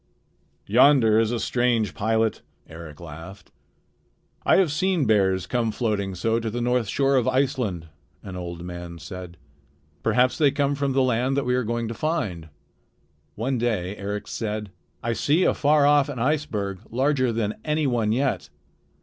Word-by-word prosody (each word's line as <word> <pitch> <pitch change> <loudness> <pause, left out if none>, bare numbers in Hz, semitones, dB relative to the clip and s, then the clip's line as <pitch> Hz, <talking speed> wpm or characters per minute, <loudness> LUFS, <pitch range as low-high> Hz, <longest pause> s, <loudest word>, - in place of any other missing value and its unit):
"Yonder 115 -1 +5
is 115 -1 +2
a 120 - -1
strange 120 -5 +1
pilot," 110 +1 0 0.3
Eric 80 -2 -10
laughed. 85 +4 -10 0.9
"I - - +4
have 185 -6 +3
seen 180 -1 +1
bears 95 -4 +2
come 115 +3 0
floating 105 -5 -2
so 115 +5 0
to 115 -1 -3
the 120 +3 -3
north 125 -1 +1
shore 135 +5 +2
of 125 - +1
Iceland," 130 - 0 0.4
an 95 - -8
old 85 -1 -6
man 85 -1 -7
said. 90 +1 -9 0.6
"Perhaps 125 +3 +2
they 145 -3 +5
come 140 0 0
from 140 -1 -1
the 135 0 +3
land 130 +2 +1
that 140 - 0
we 125 - +1
are 125 0 +1
going 115 +1 -2
to 115 - -4
find." 110 - -2 0.9
One 125 +3 -1
day 105 -5 -1
Eric 105 +1 -5
said: 105 -2 -4 0.3
"I 115 0 0
see 145 - +2
afar 145 -2 +3
off 145 -1 +4
an 140 - -5
iceberg 115 -8 -1
larger 130 0 +1
than 110 -2 -2
any 155 0 0
one 115 -5 +1
yet. 130 +3 0
115 Hz, 160 wpm, -24 LUFS, 100-135 Hz, 0.9 s, Yonder